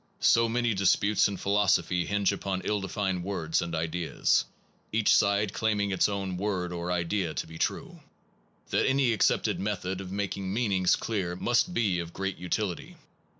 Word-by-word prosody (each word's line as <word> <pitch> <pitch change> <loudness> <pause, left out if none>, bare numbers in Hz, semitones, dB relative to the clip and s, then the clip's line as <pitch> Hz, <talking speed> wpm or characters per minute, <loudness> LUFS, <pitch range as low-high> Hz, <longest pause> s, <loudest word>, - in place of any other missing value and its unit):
So 115 0 +4
many 120 0 +1
disputes 100 +2 +3
in 100 -1 -4
philosophy 100 -3 +1
hinge 100 -1 +1
upon 95 -1 -3
ill 105 -1 0
defined 95 -2 -2
words 85 -4 -1
and 85 -1 -3
ideas, 80 +1 0 0.5
each 110 -1 +3
side 100 0 +2
claim 110 -2 0
ing 100 -1 0
its 95 +2 +2
own 95 -2 -3
word 90 -3 -2
or 85 0 -3
idea 85 0 -1
to - - -2
be 80 0 -11
true, - - -2 0.7
that - - +2
any 135 -3 +3
accepted 110 - +1
method 95 -2 -3
of 95 -1 -8
making 100 -1 -3
meanings 100 -5 +2
clear 95 -6 -3
must 120 - +1
be 100 -7 +1
of 85 0 -6
great 95 0 -3
utility. 90 0 -3
95 Hz, 165 wpm, -28 LUFS, 90-105 Hz, 0.7 s, So